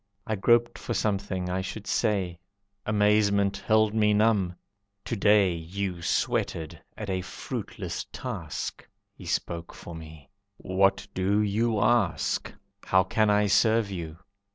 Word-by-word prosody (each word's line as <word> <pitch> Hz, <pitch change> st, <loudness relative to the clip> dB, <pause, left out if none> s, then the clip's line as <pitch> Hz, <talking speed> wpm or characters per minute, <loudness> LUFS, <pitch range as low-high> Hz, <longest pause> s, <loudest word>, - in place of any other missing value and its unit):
I 110 Hz, -, -1 dB
groped 120 Hz, +4 st, +3 dB
for 120 Hz, -, -4 dB
something 100 Hz, -3 st, -1 dB
I 90 Hz, +1 st, -1 dB
should 100 Hz, +2 st, -6 dB
say; 95 Hz, -7 st, 0 dB, 0.5 s
Amazement 105 Hz, -1 st, +3 dB
held 110 Hz, 0 st, +2 dB
me 105 Hz, -1 st, +3 dB
numb. 105 Hz, -5 st, +2 dB, 0.5 s
"To -, -, -2 dB
day 100 Hz, -3 st, +4 dB
You 90 Hz, +2 st, -4 dB
sweated 80 Hz, -1 st, -1 dB, 0.2 s
at 105 Hz, -, -5 dB
a 95 Hz, -1 st, -1 dB
fruitless 90 Hz, -, -6 dB
task." -, -, -5 dB, 0.3 s
He -, -, -12 dB
spoke 85 Hz, 0 st, -3 dB
for 85 Hz, -, -9 dB
me, 80 Hz, +1 st, -11 dB, 0.3 s
"What 95 Hz, +1 st, +1 dB
do 95 Hz, +3 st, +1 dB
you 110 Hz, +2 st, +1 dB
ask? 105 Hz, -6 st, +1 dB, 0.4 s
How 95 Hz, 0 st, +4 dB
can 110 Hz, +3 st, +1 dB
I 105 Hz, 0 st, +4 dB
serve 110 Hz, +1 st, +3 dB
you?" 85 Hz, -4 st, -6 dB
100 Hz, 130 wpm, -27 LUFS, 95-105 Hz, 0.5 s, day